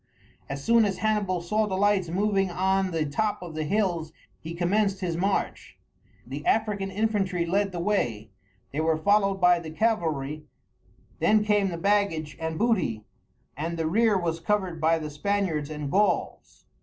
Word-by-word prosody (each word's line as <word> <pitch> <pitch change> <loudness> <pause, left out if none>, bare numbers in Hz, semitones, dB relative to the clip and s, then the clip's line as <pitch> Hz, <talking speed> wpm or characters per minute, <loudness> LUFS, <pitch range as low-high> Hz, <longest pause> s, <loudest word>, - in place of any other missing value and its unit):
As 140 0 -5
soon 230 0 +5
as 195 -3 0
Hannibal 200 -3 0
saw 210 +5 0
the 190 -2 -2
lights 200 -3 +2
moving 195 +1 +1
on 190 +2 +1
the 165 -3 -1
top 205 +7 -1
of 170 -2 -8
the 155 0 -2
hills 175 -4 0 0.3
he 165 +2 -7
commenced 195 +3 +1
his 175 -3 -2
march. 190 +3 -2 0.5
The 140 +4 -6
African 210 -2 0
infantry 195 -4 0
led 195 +3 0
the 175 - -5
way; 120 - -1 0.4
they 145 - -2
were 160 0 +2
followed 195 +3 +2
by 180 -1 +5
the 165 -2 -8
cavalry; 155 -7 -1 0.7
then 215 0 +4
came 205 -2 +2
the 170 - -4
baggage 180 -5 0
and 160 0 -3
booty, 185 - 0 0.5
and 165 +4 -3
the 165 - -1
rear 215 +5 +3
was 165 -2 -2
covered 185 -2 -1
by 165 +1 +3
the 155 -2 -5
Spaniards 160 -2 -1
and 150 -2 -5
Gauls. 205 +2 -1
185 Hz, 165 wpm, -26 LUFS, 160-205 Hz, 0.7 s, soon